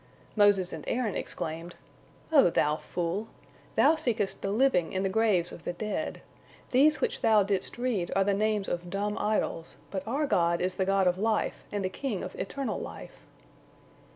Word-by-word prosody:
Moses 205 -4 +4
and - - -6
Aaron 235 -5 0
exclaimed: 165 +2 -5 0.6
"O 280 - +6
thou 150 -2 +1
fool! 180 +7 -3 0.5
Thou 320 - +5
seekest 235 -10 -1
the 195 - -2
Living 210 -6 +2
in 190 0 0
the 195 - +1
graves 195 -4 +2
of 165 - -10
the 175 - -3
dead. 210 +4 -4 0.5
These 290 +4 +4
which 485 0 -1
thou 220 -3 +5
didst 195 +1 0
read 240 -8 -1
are 195 - +4
the 200 +1 +1
names 210 0 0
of 175 0 -3
dumb 205 +2 -2
idols, 210 -6 -1
but 190 - -2
our 280 +6 0
God 170 -9 +2
is 185 +1 0
the 190 - -1
God 195 0 +2
of 180 +1 +2
life 220 +1 0
and 205 -2 -2
the - - +2
King 210 +1 -4
of - - -6
eternal 260 +2 -3
life." - - -9
200 Hz, 180 wpm, -29 LUFS, 180-225 Hz, 0.6 s, O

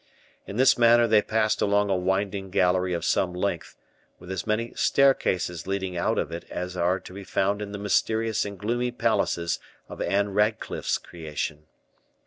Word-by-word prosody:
In 100 - -6
this 130 -1 +5
manner 120 0 +6
they 110 -2 +4
passed 110 0 0
along 100 0 +2
a - - +3
winding 95 +1 -1
gallery 90 0 +2
of 85 -1 -2
some 90 -1 +1
length, 90 -2 -3 0.4
with 90 - -10
as 95 - -4
many 115 +2 -1
staircases 95 - +2
leading 95 -2 -2
out 85 - 0
of - - -1
it 85 +1 -6
as 90 +1 -5
are 90 +2 +1
to 90 - -12
be 100 +1 -8
found 100 +2 0
in 100 -1 -5
the 100 - -5
mysterious 110 +2 +1
and 100 -1 -6
gloomy 120 +4 -1
palaces 115 -8 0 0.3
of - - -8
Ann 100 +1 +1
Radcliffe's 105 +2 0
creation. 75 -2 -6
100 Hz, 170 wpm, -26 LUFS, 90-110 Hz, 0.4 s, manner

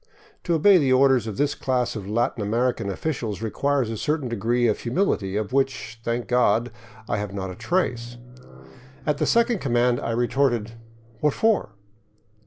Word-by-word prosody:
To 170 - +1
obey 185 +4 +6
the 135 -4 +1
orders 130 -3 +4
of 105 - -5
this 145 0 +1
class 125 -2 -1
of 100 -2 -6
Latin 115 +1 0
American 115 0 0
officials 110 - -3
requires 140 +3 0
a 110 - -4
certain 150 +2 -1
degree 120 +2 0
of 110 - 0
humility, 120 - -1
of 105 +3 -3
which, 135 -4 -1
thank 115 +1 -2
God, 120 -1 +2 0.4
I - - -1
have 105 -1 -4
not 95 -1 -4
a - - -8
trace. 120 - -2 0.9
At 150 -2 0
the - - +1
second 235 -2 +2
command 120 -3 +1
I - - -4
retorted, 120 -1 0 0.5
"What 150 +1 +2
for?" 220 - +1
120 Hz, 165 wpm, -24 LUFS, 110-140 Hz, 0.9 s, obey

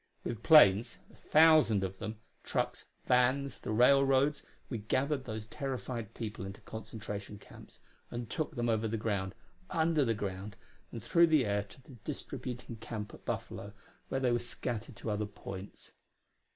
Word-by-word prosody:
With 115 -2 -4
planes 120 - +7 0.2
a - - -17
thousand 155 -10 +5
of 95 0 -4
them 110 0 -5 0.3
trucks, - - -2 0.2
vans, 130 -1 +2
the - - -7
railroads, 135 +5 +4 0.3
we 120 - -4
gathered 130 +6 0
those 110 -1 -5
terrified 130 -4 -5
people 110 -3 -5
into 95 +1 -7
concentration 105 -2 -7
camps, - - -14 0.3
and 120 -1 -5
took 155 +4 -3
them 120 -1 0
over 110 -1 +1
the 115 +1 -1
ground, 100 -3 -2 0.3
under 160 -2 +2
the 115 -3 +1
ground, 100 0 -5 0.4
and 115 - -7
through 170 0 +5
the 155 -6 +4
air 100 0 +1
to 100 +6 -15
the 130 -2 -14
distributing 120 -2 -6
camp 105 -1 -6
at - - -14
Buffalo, - - -4 0.4
where 135 - 0
they 130 -2 +2
were 120 - +2
scattered 120 -1 -4
to 110 - -4
other 105 0 -1
points. 100 -1 -9
115 Hz, 160 wpm, -32 LUFS, 105-135 Hz, 0.4 s, planes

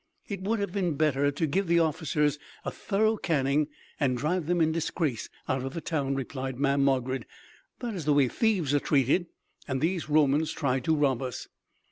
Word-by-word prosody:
"It 200 -3 -5
would 215 +4 0
have 200 -3 -2
been 180 -5 0
better 145 -1 +2
to 145 +3 -1
give 185 +6 0
the 170 0 +4
officers 150 -2 +1 0.3
a - - -1
thorough 215 +2 +1
caning 145 -4 +1 0.3
and 130 -4 +1
drive 155 +4 -1
them 175 0 +1
in 160 -1 +3
disgrace 160 -5 -2 0.2
out 130 -1 0
of 135 +1 -5
the - - -2
town," 140 -4 -1
replied 130 -1 -4
Mamm' 140 0 +2
Margarid. 130 -1 +1 0.6
"That 240 -3 -3
is 175 -7 -5
the 150 - +4
way 140 -2 +4
thieves 185 - +1
are 145 - +4
treated, 145 +6 +2 0.4
and 130 -2 -1
these 165 +2 -1
Romans 150 +1 +3
tried 130 -4 -1
to 160 - +3
rob 135 -4 +2
us." 125 -2 -5
150 Hz, 190 wpm, -28 LUFS, 135-170 Hz, 0.6 s, the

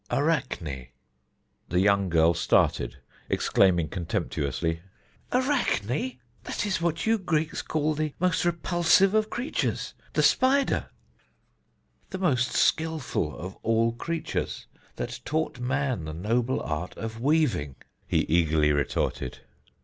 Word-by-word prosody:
"Arachne." 120 - -1 0.8
The 90 - +2
young 100 -1 +3
girl 85 0 +4
started, - - +1 0.3
exclaiming 85 -4 +3
contemptuously: 80 -2 -2 0.5
"Arachne? 255 - +1
That 120 - -1
is 130 -3 -2 0.3
that - - -2
is 190 -4 -1
what 170 -1 0
you 225 0 +3
Greeks 160 -4 -1
call 155 0 0
the 155 -1 -2
most 180 -1 +1
repulsive 175 +2 +3
of 215 0 +2
creatures 245 +4 -2 0.2
the - - +2
spider." 270 +2 +3 1.2
"The 190 - -4
most 130 -10 +1
skilful 155 - 0
of 95 +2 -7
all 115 +1 +2
creatures, 165 +7 -3 0.3
that - - -5
taught 155 -4 -2
man 130 - -1
the 80 - -5
noble 115 +8 0
art 75 +4 -4
of 115 0 -6
weaving," 130 - +1 0.3
he - - +2
eagerly 80 -2 +2
retorted. 70 -3 -2
125 Hz, 120 wpm, -27 LUFS, -, 1.2 s, girl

